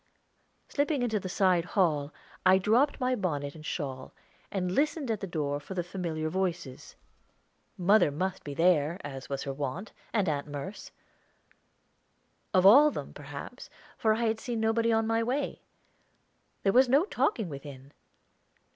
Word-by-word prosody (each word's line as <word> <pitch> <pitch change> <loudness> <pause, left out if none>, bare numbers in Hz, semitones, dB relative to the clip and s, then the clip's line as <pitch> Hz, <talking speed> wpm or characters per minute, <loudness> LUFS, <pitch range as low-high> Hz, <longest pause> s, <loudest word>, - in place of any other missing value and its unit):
Slipping 285 -2 0
into 220 -3 0
the 185 - -6
side 180 -2 +3
hall, 150 -6 +2 0.3
I 185 0 +6
dropped 230 +9 +2
my 255 0 +1
bonnet 150 - -2
and 155 - -12
shawl, 135 -5 -5 0.4
and 180 -2 -2
listened 290 - 0
at 215 - -1
the 195 - -5
door 145 -4 -2
for 150 +6 -9
the 175 - -1
familiar 170 -3 -3
voices. 175 -6 -3 0.8
Mother 195 -1 +4
must 185 +6 -3
be 145 -1 -6
there, 165 0 +3
as 135 -2 -7
was 140 -1 -3
her 140 - -4
wont, 145 +8 -4 0.2
and 205 -5 +1
Aunt 145 -2 -1
Merce. 145 +7 -7 1.6
All 205 +11 +7
of 300 - -1
them, - - -6
perhaps, - - -9 0.3
for 220 -1 +2
I 235 - -2
had 220 0 0
seen 235 0 -3
nobody 225 +1 +2
on 225 0 +2
my 225 +1 +1
way. 255 +5 -2 1.0
There 195 - +3
was 255 0 +5
no 285 +7 +4
talking 235 - 0
within. 140 -2 -10
185 Hz, 155 wpm, -29 LUFS, 150-225 Hz, 1.6 s, All